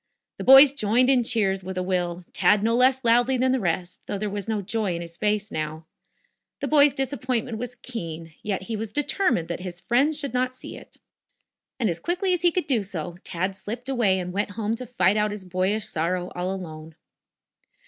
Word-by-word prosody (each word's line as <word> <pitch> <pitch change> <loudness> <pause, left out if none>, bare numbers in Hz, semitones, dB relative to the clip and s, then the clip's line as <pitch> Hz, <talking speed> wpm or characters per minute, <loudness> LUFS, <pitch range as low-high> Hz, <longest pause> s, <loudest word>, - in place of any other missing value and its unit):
The - - -3
boys 270 +1 +9
joined 250 +1 +3
in 260 - +4
the 240 - -1
cheers 195 -5 +1
with 190 0 -6
a 185 - 0
will, 180 -1 -2
Tad 210 -1 +3
no 230 +1 +2
less 260 +1 +4
loudly 245 +3 +4
than 255 +1 +2
the 260 - +1
rest, 175 -2 -2
though 205 - -3
there 210 0 -3
was 200 -1 -5
no 220 -2 -1
joy 210 -2 -1
in 170 - -4
his 170 0 -10
face 210 +2 -1
now. 155 +1 -4 0.7
The - - -2
boy's 290 -1 +5
disappointment 255 -4 -2
was 245 +1 -5
keen, 165 -10 -7
yet 195 -3 -3
he 225 +3 -4
determined 225 - 0
that 170 - -3
his 180 -1 -7
friends 265 - +2
should 280 -5 -4
not 255 0 0
see - - -9
it. - - -14 0.8
And, 235 - +1
as 170 -3 -2
quickly 365 +2 0
as 355 - -1
he 350 0 +4
could 360 -2 -1
do 255 -7 +1
so, 175 -3 -6
Tad 185 +2 -2
slipped 230 +6 -6
away 230 -8 +2
and 180 -1 -4
went 205 +2 -1
home 220 0 -1
to 250 0 -7
fight 205 -4 +2
out 210 0 +2
his 205 -2 -7
boyish 185 +4 0
sorrow 180 -1 -2
all 180 +1 -2
alone. 160 -4 -8
210 Hz, 210 wpm, -25 LUFS, 180-250 Hz, 0.8 s, boys